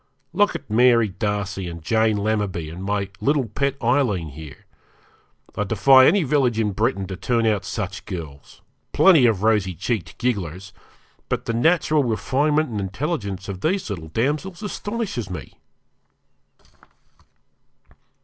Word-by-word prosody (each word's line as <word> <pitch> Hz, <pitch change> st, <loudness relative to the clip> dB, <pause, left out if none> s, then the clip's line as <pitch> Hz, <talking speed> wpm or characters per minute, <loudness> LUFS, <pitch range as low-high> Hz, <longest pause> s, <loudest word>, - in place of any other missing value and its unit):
Look 205 Hz, +3 st, +2 dB
at 140 Hz, -, -7 dB
Mary 115 Hz, 0 st, +4 dB
Darcy 100 Hz, -1 st, -3 dB
and 85 Hz, -1 st, -9 dB
Jane 110 Hz, +3 st, +2 dB
Lammerby, 100 Hz, -6 st, -2 dB
and 90 Hz, +3 st, -8 dB
my 100 Hz, -1 st, -1 dB
little 140 Hz, -2 st, +1 dB
pet 140 Hz, +5 st, -1 dB
Aileen 115 Hz, -, +1 dB
here. 75 Hz, -1 st, -11 dB, 0.9 s
I 105 Hz, -, 0 dB
defy 130 Hz, +6 st, +6 dB
any 190 Hz, +2 st, +4 dB
village 135 Hz, -5 st, +1 dB
in 105 Hz, -2 st, +1 dB
Britain 100 Hz, -1 st, -1 dB
to 95 Hz, -, -6 dB
turn 115 Hz, +4 st, 0 dB
out 105 Hz, -3 st, +1 dB
such 95 Hz, -2 st, -5 dB
girls 75 Hz, -6 st, -9 dB, 0.3 s
plenty 160 Hz, -10 st, +6 dB
of 105 Hz, -4 st, 0 dB
rosy 105 Hz, -5 st, +2 dB
cheeked 100 Hz, +2 st, -3 dB
gigglers 95 Hz, -6 st, -3 dB, 0.6 s
but -, -, -2 dB
the 115 Hz, -, -2 dB
natural 155 Hz, +3 st, +2 dB
refinement 145 Hz, +6 st, +1 dB
and 110 Hz, -3 st, -3 dB
intelligence 100 Hz, -, -3 dB
of 95 Hz, -2 st, -6 dB
these 180 Hz, -, -1 dB
little 80 Hz, -5 st, -6 dB
damsels 150 Hz, -, -2 dB
astonishes 205 Hz, -, -4 dB
me.' 90 Hz, -, -7 dB
110 Hz, 135 wpm, -22 LUFS, 95-135 Hz, 0.9 s, defy